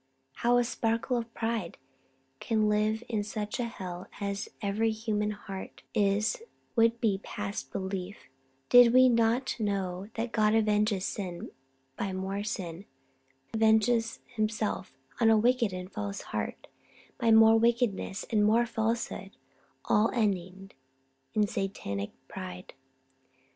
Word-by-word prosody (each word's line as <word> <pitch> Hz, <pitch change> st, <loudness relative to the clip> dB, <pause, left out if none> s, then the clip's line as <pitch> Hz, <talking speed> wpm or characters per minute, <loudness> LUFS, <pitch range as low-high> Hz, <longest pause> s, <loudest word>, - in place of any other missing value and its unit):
How 240 Hz, +1 st, +3 dB
a 245 Hz, -, +4 dB
spark 230 Hz, +1 st, -1 dB
of 235 Hz, -2 st, 0 dB
pride 225 Hz, -6 st, -2 dB, 0.6 s
can 220 Hz, -2 st, +1 dB
live 215 Hz, +2 st, +1 dB
in 215 Hz, -3 st, -1 dB
such 210 Hz, +1 st, -4 dB
a 245 Hz, -, 0 dB
hell 185 Hz, -4 st, -7 dB
as 200 Hz, 0 st, -3 dB
every 215 Hz, +2 st, 0 dB
human 215 Hz, -1 st, -1 dB
heart 195 Hz, -2 st, -8 dB
is 205 Hz, -, +1 dB, 0.3 s
would 230 Hz, 0 st, +4 dB
be 205 Hz, -4 st, +1 dB
past 205 Hz, -1 st, -5 dB
belief, 190 Hz, 0 st, -5 dB, 0.4 s
did 245 Hz, -1 st, +7 dB
we 255 Hz, 0 st, +8 dB
not 235 Hz, +2 st, +1 dB
know 195 Hz, -3 st, -2 dB
that 230 Hz, +1 st, -2 dB
God 215 Hz, -1 st, +3 dB
avenges 210 Hz, -2 st, +2 dB
sin 180 Hz, -4 st, -5 dB, 0.5 s
by 195 Hz, -1 st, -2 dB
more 190 Hz, +2 st, -3 dB
sin; 185 Hz, -3 st, -5 dB, 0.7 s
avenges 225 Hz, +1 st, +3 dB
Himself 215 Hz, -, -2 dB, 0.2 s
on 225 Hz, -2 st, +5 dB
a 220 Hz, -, +6 dB
wicked 235 Hz, -1 st, +3 dB
and 180 Hz, 0 st, -5 dB
a -, -, -23 dB
false 205 Hz, -2 st, -4 dB
heart -, -, -3 dB, 0.5 s
by 235 Hz, -2 st, +2 dB
more 225 Hz, 0 st, +7 dB
wickedness 230 Hz, -4 st, +1 dB
and 215 Hz, -2 st, +3 dB
more 225 Hz, +3 st, +4 dB
falsehood, 225 Hz, -3 st, -2 dB, 0.5 s
all 215 Hz, +2 st, +3 dB
ending 195 Hz, -3 st, -1 dB, 0.6 s
in 210 Hz, -1 st, +4 dB
Satanic 190 Hz, -, -3 dB, 0.2 s
pride. 185 Hz, -1 st, -8 dB
215 Hz, 130 wpm, -29 LUFS, 195-230 Hz, 0.7 s, we